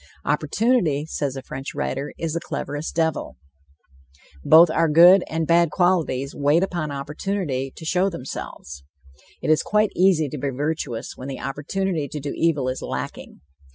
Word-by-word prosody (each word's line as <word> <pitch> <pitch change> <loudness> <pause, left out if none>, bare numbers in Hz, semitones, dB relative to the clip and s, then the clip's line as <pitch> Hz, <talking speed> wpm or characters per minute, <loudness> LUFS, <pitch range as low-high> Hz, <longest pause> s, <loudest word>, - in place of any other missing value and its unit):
"Opportunity," 210 - +1
says 145 -4 -3
a 135 - -6
French 135 +2 -7
writer, 140 0 -3
"is 165 -2 -3
the 170 - -1
cleverest 145 -1 -5
devil." 160 -2 -1 1.1
Both 160 +1 +7
our 165 0 +2
good 175 +5 +7
and 160 0 -1
bad 170 +1 +4
qualities 160 -7 +1
wait 145 +5 +2
upon 175 -5 -2
opportunity 145 -1 -3
to 160 - -10
show 180 +4 +2
themselves. 125 - -8 0.6
It - - +2
is 155 - +4
quite 210 0 +1
easy 180 -5 +3
to 150 - -6
be 140 - -1
virtuous 140 -3 -3
when 130 - -8
the 135 -2 -6
opportunity 150 +4 -2
to 150 - -6
do 145 0 -4
evil 150 -6 +1
is 130 0 -3
lacking. - - -6
155 Hz, 155 wpm, -23 LUFS, 140-170 Hz, 1.1 s, Both